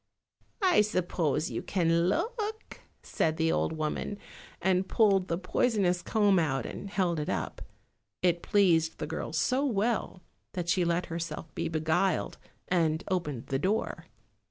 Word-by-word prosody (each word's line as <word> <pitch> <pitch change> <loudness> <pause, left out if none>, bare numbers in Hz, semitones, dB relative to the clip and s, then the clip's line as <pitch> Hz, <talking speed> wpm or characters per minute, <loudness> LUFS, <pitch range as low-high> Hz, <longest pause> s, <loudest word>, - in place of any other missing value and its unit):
"I 365 - +5
suppose 175 -5 0
you - - -3
can 170 -1 +2
look," 440 - -3 0.2
said 160 0 0
the 165 -1 +2
old - - +1
woman, 155 +6 -3 0.4
and 190 0 +1
pulled 195 -4 +3
the 165 - -1
poisonous 185 -1 +1
comb 205 -1 +3
out 135 -5 0
and 200 - -6
held 180 -5 0
it 150 - -3
up. 95 -6 -3 0.6
It 175 -1 +2
pleased 170 -6 +3
the 155 - -3
girl 160 +1 -4
so 255 - +1
well 220 -6 -1 0.3
that 175 -2 -3
she 180 +1 +3
let 170 +1 +1
herself 165 -1 -5
be 170 - -2
beguiled, 160 +4 0 0.3
and 160 -3 +1
opened 150 -10 -2
the 135 - 0
door. 200 +7 -1
175 Hz, 145 wpm, -29 LUFS, 160-200 Hz, 0.6 s, I